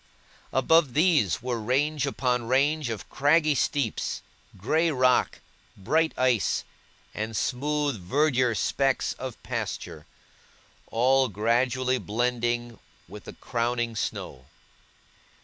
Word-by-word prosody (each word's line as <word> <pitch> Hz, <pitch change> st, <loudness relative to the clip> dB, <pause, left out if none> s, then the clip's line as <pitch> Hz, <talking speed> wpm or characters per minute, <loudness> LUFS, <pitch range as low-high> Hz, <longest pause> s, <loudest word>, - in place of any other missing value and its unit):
Above 145 Hz, 0 st, +3 dB
these, 150 Hz, -, +2 dB
were 125 Hz, -2 st, -2 dB
range 140 Hz, +5 st, 0 dB
upon 125 Hz, -3 st, -1 dB
range 140 Hz, +2 st, +1 dB
of 110 Hz, -4 st, -5 dB
craggy 150 Hz, +2 st, +3 dB
steeps, 140 Hz, -3 st, -1 dB, 0.3 s
grey 160 Hz, -, +1 dB
rock, 130 Hz, -4 st, +2 dB, 0.4 s
bright 160 Hz, +11 st, +1 dB
ice, 125 Hz, -4 st, +1 dB, 0.5 s
and 110 Hz, 0 st, -4 dB
smooth 145 Hz, -2 st, -1 dB
verdure 130 Hz, -, +1 dB
specks 135 Hz, +6 st, 0 dB
of 130 Hz, -2 st, -6 dB
pasture, 75 Hz, -1 st, -5 dB, 0.8 s
all 130 Hz, +3 st, +3 dB
gradually 125 Hz, +5 st, +1 dB
blending 120 Hz, 0 st, -2 dB, 0.3 s
with 105 Hz, +4 st, -11 dB
the -, -, -9 dB
crowning 120 Hz, -1 st, -2 dB
snow. 65 Hz, -10 st, -5 dB
125 Hz, 100 wpm, -26 LUFS, 115-145 Hz, 0.8 s, Above